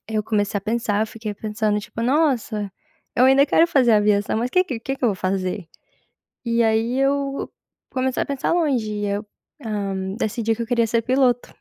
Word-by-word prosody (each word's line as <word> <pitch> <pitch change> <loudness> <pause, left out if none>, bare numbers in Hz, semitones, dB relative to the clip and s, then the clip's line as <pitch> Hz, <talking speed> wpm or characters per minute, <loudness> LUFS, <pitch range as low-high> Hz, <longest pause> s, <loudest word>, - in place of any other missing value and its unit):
eu 215 -1 -1
comecei 205 -1 0
a - - -9
pensar, 215 -1 0
eu 220 - -1
fiquei 215 -1 -6
pensando 210 0 -1
tipo: 225 +2 -6
"Nossa, 240 -7 0 0.4
eu 250 - +5
ainda 275 +2 +5
quero 325 +4 +4
fazer 265 -8 +3
aviação, 210 0 +2
mas 240 +2 -1
que 365 +4 +3
que 250 -10 -5
que 270 +3 -3
que 255 - -4
eu - - +5
vou - - -2
fazer?" 185 0 -2 0.8
E 235 0 +2
aí 225 +3 +1
eu 275 0 0 0.4
comecei 260 0 0
a - - -3
pensar 280 -2 -1
longe 275 -11 +1
e 205 0 -2
eu, 205 +1 -2 0.4
hã, 195 -3 -3
decidi 225 0 -1
que 235 - -4
eu - - -4
queria 235 -1 +2
ser 230 +1 +1
piloto. 250 0 +1
225 Hz, 195 wpm, -22 LUFS, 210-260 Hz, 0.8 s, eu